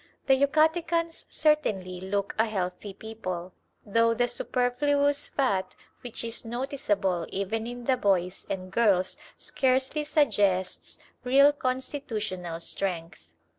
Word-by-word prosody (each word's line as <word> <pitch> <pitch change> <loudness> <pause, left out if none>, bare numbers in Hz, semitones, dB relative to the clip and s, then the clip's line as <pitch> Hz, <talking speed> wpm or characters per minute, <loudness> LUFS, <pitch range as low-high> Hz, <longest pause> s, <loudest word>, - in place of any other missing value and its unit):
The 270 - +5
Yucatecans 320 +4 +2
certainly 195 - +1
look 200 +1 -2
a 225 - +4
healthy 190 -1 -3
people, 185 -4 -6 0.3
though 230 +2 +3
the 245 +1 +2
superfluous 280 +4 +1
fat 200 -9 0 0.3
which 245 -2 -6
is 230 0 -4
noticeable 225 - -1
even 220 +4 -2
in 245 0 -6
the 255 +1 +2
boys 190 -5 0
and 185 -1 -4
girls 195 -6 +2 0.2
scarcely 265 +3 0
suggests 205 - +1 0.3
real 275 +3 +6
constitutional 225 - -3
strength. 165 - -4
230 Hz, 110 wpm, -27 LUFS, 190-270 Hz, 0.3 s, real